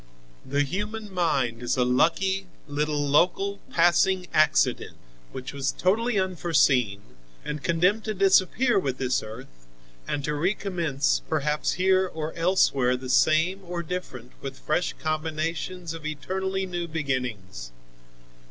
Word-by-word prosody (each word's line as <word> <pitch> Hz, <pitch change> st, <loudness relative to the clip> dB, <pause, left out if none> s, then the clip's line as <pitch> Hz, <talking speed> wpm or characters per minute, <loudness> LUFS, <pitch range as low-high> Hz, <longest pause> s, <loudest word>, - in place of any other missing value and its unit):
The 140 Hz, +2 st, 0 dB
human 210 Hz, +6 st, -4 dB
mind 135 Hz, -10 st, 0 dB
is 120 Hz, +2 st, -1 dB
a 125 Hz, -, +3 dB
lucky 190 Hz, +9 st, +1 dB, 0.2 s
little 145 Hz, 0 st, -1 dB
local, 190 Hz, +7 st, +2 dB
passing 175 Hz, +2 st, +3 dB
accident 155 Hz, -, +2 dB, 0.3 s
which 130 Hz, 0 st, -7 dB
was 135 Hz, -1 st, -1 dB
totally 220 Hz, +5 st, +1 dB
unforeseen, 140 Hz, -, +1 dB, 0.4 s
and 150 Hz, 0 st, -4 dB
condemned 180 Hz, +6 st, +2 dB
to 215 Hz, -1 st, -2 dB
disappear 195 Hz, +4 st, +3 dB
with 135 Hz, -7 st, -2 dB
this 130 Hz, -1 st, 0 dB
earth 110 Hz, -, -11 dB, 0.4 s
and 145 Hz, -, -2 dB
to 150 Hz, -, -1 dB
recommence 165 Hz, -4 st, 0 dB
perhaps 150 Hz, -1 st, 0 dB
here 190 Hz, +1 st, +3 dB
or 160 Hz, -2 st, -5 dB
elsewhere 140 Hz, -8 st, +2 dB
the 130 Hz, 0 st, -8 dB
same 165 Hz, +8 st, +3 dB
or 175 Hz, -1 st, -4 dB
different 145 Hz, -8 st, -6 dB
with 135 Hz, -1 st, -6 dB
fresh 155 Hz, +3 st, -1 dB
combinations 160 Hz, +2 st, -3 dB
of 165 Hz, -1 st, -9 dB
eternally 190 Hz, +5 st, -3 dB
new 175 Hz, -2 st, -4 dB
beginnings. 125 Hz, -, -4 dB
160 Hz, 125 wpm, -26 LUFS, 135-185 Hz, 0.4 s, a